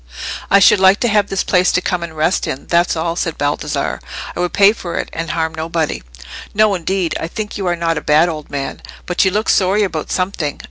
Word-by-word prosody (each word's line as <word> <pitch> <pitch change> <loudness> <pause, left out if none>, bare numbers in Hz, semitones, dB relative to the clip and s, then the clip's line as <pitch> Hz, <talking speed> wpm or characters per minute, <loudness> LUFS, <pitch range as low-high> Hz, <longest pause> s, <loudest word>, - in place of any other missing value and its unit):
"I 200 - +6
should 200 0 +6
like 190 +1 +5
to 240 - +2
have 205 -1 +2
this 195 - -1
place 180 0 +3
to - - +3
come 180 -1 -2
and 165 -2 -7
rest 160 +4 +1
in, 130 - -5
that's 170 0 +2
all," 165 +1 -2
said 165 -2 -2
Baldassarre. 145 0 -2 0.4
"I - - -6
would 180 0 0
pay 200 +1 +5
for 175 -6 -6
it, - - -3
and 165 0 -4
harm 160 -1 -1
nobody." 160 0 -2 0.5
"No, 215 -1 +4
indeed; 185 -1 -1
I - - -3
think 210 +4 -5
you 195 -3 -3
are 175 - +1
not 165 -2 -1
a - - -13
bad 155 +3 +4
old 155 -3 -5
man. 140 -1 -5 0.2
But 180 - +1
you - - +4
look 210 +3 -1
sorry 195 +2 +3
about 160 -6 -3
something. 180 -6 -2
175 Hz, 230 wpm, -17 LUFS, 160-195 Hz, 0.5 s, I